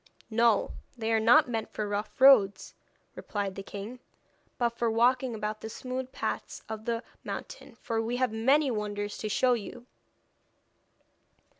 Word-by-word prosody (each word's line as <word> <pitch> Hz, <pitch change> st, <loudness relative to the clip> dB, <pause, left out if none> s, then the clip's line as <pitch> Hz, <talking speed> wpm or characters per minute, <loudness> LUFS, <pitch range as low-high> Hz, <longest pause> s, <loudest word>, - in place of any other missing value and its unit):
'No, 230 Hz, -1 st, +3 dB, 0.3 s
they 225 Hz, -1 st, -1 dB
are 220 Hz, -, +4 dB
not 245 Hz, +8 st, +6 dB
meant 225 Hz, -2 st, -3 dB
for 215 Hz, -, -3 dB
rough 205 Hz, +3 st, -4 dB
roads,' 255 Hz, -7 st, +5 dB, 0.4 s
replied 200 Hz, -2 st, -4 dB
the 195 Hz, -, -6 dB
king, 205 Hz, +5 st, -8 dB, 0.6 s
'but 240 Hz, -1 st, +2 dB
for 235 Hz, 0 st, -1 dB
walking 245 Hz, +2 st, +2 dB
about 215 Hz, 0 st, -4 dB
the 220 Hz, -, -6 dB
smooth 255 Hz, +2 st, -5 dB
paths -, -, -4 dB
of 220 Hz, 0 st, -6 dB
the 230 Hz, 0 st, -2 dB, 0.2 s
mountain, -, -, -7 dB
for 225 Hz, -1 st, -2 dB
we 235 Hz, +2 st, -2 dB
have 255 Hz, -3 st, 0 dB
many 270 Hz, +5 st, +3 dB
wonders 205 Hz, -1 st, -3 dB
to 215 Hz, -, -3 dB
show 250 Hz, +4 st, +3 dB
you.' 235 Hz, +1 st, -6 dB
225 Hz, 150 wpm, -29 LUFS, 210-245 Hz, 0.6 s, not